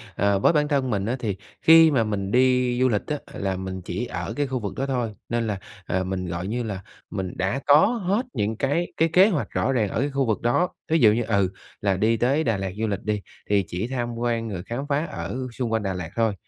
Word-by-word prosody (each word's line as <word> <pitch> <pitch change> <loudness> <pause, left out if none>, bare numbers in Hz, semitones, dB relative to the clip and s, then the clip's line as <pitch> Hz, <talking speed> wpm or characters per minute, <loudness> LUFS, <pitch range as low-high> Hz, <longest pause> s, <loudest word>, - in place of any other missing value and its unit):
ờ, 100 -1 +2
với 165 - +4
bản 150 -1 +2
thân 140 -3 +1
mình 100 -3 0
á, 120 +3 0
thì 105 -5 -2 0.3
khi 160 0 +8
mà 125 -6 +3
mình 100 -2 -2
đi 125 -1 +3
du 130 - +4
lịch 105 -4 +1
á 150 - -1 0.2
là 95 -1 -2
mình 95 0 -5
chỉ 90 +7 -4
ở - - -4
cái 145 -1 -1
khu 130 -1 -2
vực 100 -3 -4
đó 135 - -1
thôi, 125 -5 -1 0.2
nên 115 -1 0
là, 100 -3 -2 0.3
ờ, 95 +1 0
mình 95 -1 -3
gọi 85 +2 -4
như 120 +4 -2
là 100 -4 -4 0.3
mình 95 -2 -4
đã 100 +9 0
có 145 +2 +7
hết 220 0 0
những 105 +2 -1
cái 145 +8 -1
cái 165 +1 +3
kế 190 +4 +7
hoạch 165 -9 -1
rõ 135 - 0
ràng 115 -6 +1
ở - - -2
cái 140 - +1
khu 135 -1 0
vực 110 -3 0
đó. 145 +10 +2 0.2
Ví 165 - +4
dụ 110 -4 +7
như, 115 +2 +1
ừ, 100 -4 +1 0.3
là 100 -2 +1
đi 110 +3 +2
tới 135 +7 +2
Đà 115 -4 +1
Lạt 95 -1 -3
du 110 0 0
lịch 100 -1 -3
đi, 105 -1 -1 0.3
thì 100 -1 +3
chỉ 95 +7 -3
tham 120 -2 -3
quan 115 -1 -1
rồi 90 -3 -5
khám 130 +5 -4
phá 145 +3 +1
ở 85 - -5
xung 120 -1 -3
quanh 110 -1 0
Đà 95 -1 -1
Lạt 90 -2 -5
thôi, 115 -2 +2
115 Hz, 260 wpm, -24 LUFS, 100-135 Hz, 0.3 s, khi